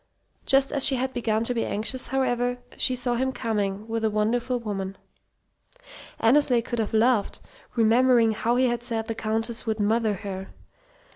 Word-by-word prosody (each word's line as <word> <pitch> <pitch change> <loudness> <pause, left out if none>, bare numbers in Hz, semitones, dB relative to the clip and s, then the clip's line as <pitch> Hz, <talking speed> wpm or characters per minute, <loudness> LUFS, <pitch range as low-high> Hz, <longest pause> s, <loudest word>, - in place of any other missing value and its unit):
Just 270 0 +3
as 275 - +1
she 270 - +7
had 260 +1 -2
begun 225 -2 0
to 245 - -1
be 230 - -1
anxious, 235 +5 -2
however, 245 -1 0 0.2
she 255 - +1
saw 245 0 -1
him 260 +2 0
coming 210 -4 -2
with 225 0 -3
a 220 - +2
wonderful 235 +4 0
woman. 195 -4 -5 1.2
Annesley 245 0 +3
could 240 0 -4
have 220 0 -1
laughed, 220 -2 +2 0.4
remembering 235 0 +4
how 230 +2 0
he 255 +1 +3
had 240 -2 0
said 230 -2 -3
the 225 - -3
Countess 225 +2 -3
would 220 -1 -1
"mother" 215 0 +1
her. 190 0 -7
230 Hz, 165 wpm, -25 LUFS, 220-250 Hz, 1.2 s, she